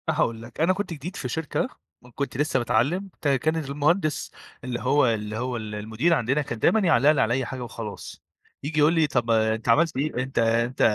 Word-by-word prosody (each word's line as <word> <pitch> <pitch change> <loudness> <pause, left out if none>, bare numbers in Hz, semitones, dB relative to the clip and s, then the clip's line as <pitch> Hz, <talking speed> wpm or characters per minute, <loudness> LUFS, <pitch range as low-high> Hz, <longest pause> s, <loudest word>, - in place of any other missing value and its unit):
أنا - - 0
هاقول 115 -1 0
لك، 120 +5 -8
أنا 175 +3 +4
كنت 195 -2 -4
جديد 165 +5 -7
في 125 - -4
شركة، 160 - -2 0.3
وكنت 125 +2 -5
لسه 145 -2 +1
باتعلّم 140 - 0
ت - - -1
كان 145 +3 +2
المهندس 155 +2 0 0.3
اللي 125 -1 -3
هو 135 +2 +3
اللي 110 -1 -2
هو 125 +1 -2
ال 110 -2 -6
المدير 110 +10 0
عَندنا، 140 0 +1
كان 115 -6 -5
دايمًا 220 - +4
يعلّق 155 - +4
لي 150 - +2
علي 115 - +2
أي 130 0 0
حاجة 130 0 -5
وخلاص، 115 -3 -8 0.4
ييجي 150 +2 -2
يقول 150 +2 +5
لي: 160 -2 +3
"طَب 120 -5 0
ما 110 -1 +3
أنت 110 +1 -6
عملت 155 +5 +3
إيه؟ 140 -2 -1
أنت 130 +1 -3
أنت" 115 +2 +1
130 Hz, 215 wpm, -25 LUFS, 115-155 Hz, 0.4 s, يقول